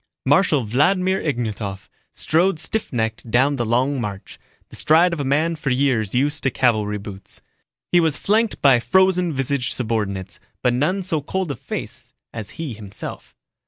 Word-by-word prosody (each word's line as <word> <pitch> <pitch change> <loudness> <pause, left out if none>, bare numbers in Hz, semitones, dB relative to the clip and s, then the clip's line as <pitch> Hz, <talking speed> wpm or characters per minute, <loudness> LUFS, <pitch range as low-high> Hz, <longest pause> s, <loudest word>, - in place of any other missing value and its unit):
Marshal 150 -1 +3
Vladimir 180 - +2
Ignatov 110 -8 -3 0.2
strode 170 +2 +1
stiff 215 +7 -2
kneed 110 -3 -1
down 135 +5 +3
the 120 - -1
long 130 +4 +1
march, 100 -3 -6 0.3
the - - -10
stride 170 +3 +4
of 170 - -3
a - - -1
man 155 +5 +1
for 150 -3 -3
years 125 -6 +1
used 145 +4 +1
to 135 - +1
cavalry 110 -5 +1
boots. 100 -1 -10 0.5
He 175 - +5
was 160 -3 +1
flanked 220 +2 0
by 135 -4 +6
frozen 185 +4 +3
visaged 135 -2 -1
subordinates, 100 -6 -3 0.2
but 125 -1 +3
none 175 +10 0
so 160 -4 -1
cold 185 +2 -2
of 130 - -7
face - - -7 0.2
as 110 -3 -6
he 160 -6 -4
himself. 105 -2 -8
135 Hz, 160 wpm, -21 LUFS, 115-165 Hz, 0.5 s, by